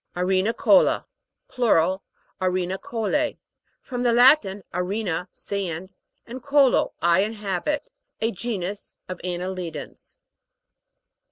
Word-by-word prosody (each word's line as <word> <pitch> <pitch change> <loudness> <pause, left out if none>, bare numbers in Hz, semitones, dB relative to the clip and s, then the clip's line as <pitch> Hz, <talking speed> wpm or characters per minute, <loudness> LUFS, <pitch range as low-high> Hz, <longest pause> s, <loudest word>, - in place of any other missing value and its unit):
ARENICO'LA 190 - +3 0.4
(Plural, 190 - +2 0.4
arenicolffi). 190 - -1 0.4
From 245 -2 -5
the 245 -1 +3
Latin, 235 -5 +5
arena, 180 -1 -2
sand, 190 -2 -4 0.3
and 250 +2 -8
colo, 280 0 +3
I 170 +1 +5
inhabit. 210 - -2 0.3
A 225 +1 +1
genus 200 -2 -4
of 185 -1 -6
anne 180 -1 -2
lidans. 185 -2 -5
195 Hz, 90 wpm, -24 LUFS, 180-240 Hz, 0.4 s, Latin